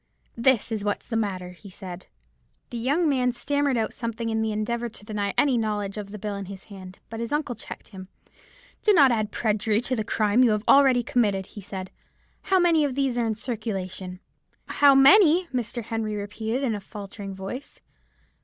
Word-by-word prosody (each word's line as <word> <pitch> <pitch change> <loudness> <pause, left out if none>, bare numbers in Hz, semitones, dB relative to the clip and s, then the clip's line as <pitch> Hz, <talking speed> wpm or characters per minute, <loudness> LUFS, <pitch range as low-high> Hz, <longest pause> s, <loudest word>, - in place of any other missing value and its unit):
"'This 235 -1 +2
is 215 -2 -2
what's 205 0 -2
the 230 - -3
matter,' 190 -5 -2
he 180 +3 -13
said. 185 -1 -9 0.6
"The 240 - -4
young 290 +8 +1
man 255 -3 +2
stammered 285 +1 0
out 225 - -1
something 230 -1 -4
in 220 0 0
the 220 0 0
endeavour 235 +3 -2
to 210 -2 -15
deny 205 -2 -2
any 270 -5 +3
knowledge 210 -3 -2
of 205 -2 -6
the 210 - -7
bill 210 0 -4
in 200 0 -5
his 195 0 -9
hand; 185 -1 -10
but 225 - -5
his 230 0 -4
uncle 295 -3 -1
checked 225 - -10
him. 190 -2 -10 0.7
'Do 425 - +4
not 280 -8 +6
add 215 -2 0
perjury 215 -1 +1
to 255 +1 0
the 220 - -1
crime 215 +2 +2
you 230 -4 +4
have 210 0 -1
already 265 -3 +6
committed,' 205 -6 +1
he 205 - -8
said. 190 -1 -7 0.5
'How 380 - +2
many 340 -4 +4
of 275 -3 -1
these 270 -3 0
are 235 -1 0
in 220 - -1
circulation?' 195 -5 -5 0.5
"'How 280 -1 +5
many!' 345 +5 +7
Mr. 240 -1 -3
Henry 220 -1 -3
repeated, 220 +5 -3
in 240 -4 +1
a 205 - -4
faltering 200 -1 -8
voice. 195 +9 -7
220 Hz, 195 wpm, -25 LUFS, 205-255 Hz, 0.7 s, many